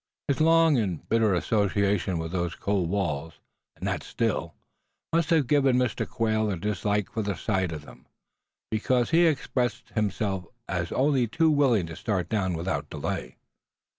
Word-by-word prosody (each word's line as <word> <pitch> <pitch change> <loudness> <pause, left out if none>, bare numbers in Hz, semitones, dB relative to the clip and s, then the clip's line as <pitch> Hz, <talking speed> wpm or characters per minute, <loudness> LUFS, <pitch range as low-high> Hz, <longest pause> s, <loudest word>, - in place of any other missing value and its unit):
His 140 +2 0
long 165 -2 +5
and 95 -8 -2
bitter 110 -4 +3
association 100 -1 +1
with 80 0 -4
those 85 -2 -2
cold 100 -4 -1
walls, 80 -6 -2 0.4
and - - -5
that - - -1
Still, - - -2 0.6
must 165 -2 +2
have 160 -5 +4
given 135 -1 +3
Mr. 125 -3 0
Quail 110 -1 0
a 95 - -2
dislike 105 +1 -1
for 110 - -2
the 100 -2 -2
sight 95 -2 -1
of 75 -2 -6
them; - - -15 0.6
because 120 +4 +1
he 170 +1 +5
expressed 125 -6 -1
himself 100 -3 -1 0.2
as 90 -2 -2
only 135 -3 +2
too 160 +8 +2
willing 130 - +3
to 80 0 -8
start 95 -3 -2
down 95 -5 0
without 90 +3 -3
delay. - - -4
105 Hz, 160 wpm, -27 LUFS, 95-125 Hz, 0.6 s, long